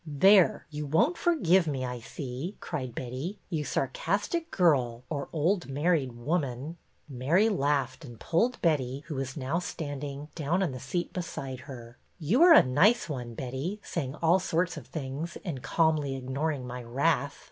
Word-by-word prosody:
'' - - -20 0.2
There! 195 -3 +6
You 150 0 -4
won't 165 - +3
forgive 190 - +3
me, 135 -3 -1
I 125 -1 -4
see," 135 - -6
cried 130 -7 -5
Betty. 130 - -4
''You 155 -3 -1
sarcastic 205 - -1
girl 130 - +2
— - - -39
or 140 -2 -3
old 170 +4 +1
married 145 -2 +1
woman! 140 +3 -2 0.2
" - - -41
Mary 155 - +2
laughed, 140 - 0
and 120 -5 -11
pulled 235 +10 +1
Betty, 140 -4 +1
who 160 - -5
was 135 +1 -4
now 140 +5 -1
standing, 145 -3 -5
down 170 +4 0
on 170 - 0
the 130 - -6
seat 175 +7 -3
beside 135 -7 -5
her. 120 -2 -10
" - - -41
You 240 - +4
are 345 -1 +9
a - - +9
nice 170 - +4
one, 120 -5 -5
Betty, 135 - -4
saying 140 -5 -3
all 170 +3 +5
sorts 180 0 0
of 150 -6 -9
things 150 +2 -5
and 150 -8 -4
calmly 150 -1 +1
ignoring 135 +2 -2
my 125 0 -6
wrath 140 +4 0
145 Hz, 175 wpm, -29 LUFS, 130-170 Hz, 0.2 s, are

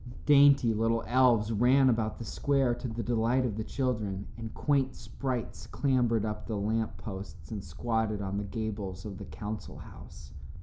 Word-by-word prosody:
Dainty 140 -4 +6
little 115 +1 +1
elves 120 -4 +3
ran 130 +5 +4
about 110 -3 +1
the 115 - -7
square 135 +3 +1
to 120 - -5
the 115 0 -4
delight 120 +3 +1
of 110 -5 -2
the 110 - -3
children, 110 -6 -2
and 115 -1 -7
quaint 135 -3 +1
sprites 120 +1 -5
clambered 120 -6 +1
up 105 0 -4
the 110 - -2
lamposts 100 -4 -4
and 105 -3 -4
squatted 110 -3 -1
on 100 0 -2
the - - -3
gables 100 -3 -5
of 100 -3 -7
the - - -7
council 105 0 -6
house. - - -12
115 Hz, 165 wpm, -30 LUFS, 105-125 Hz, -, Dainty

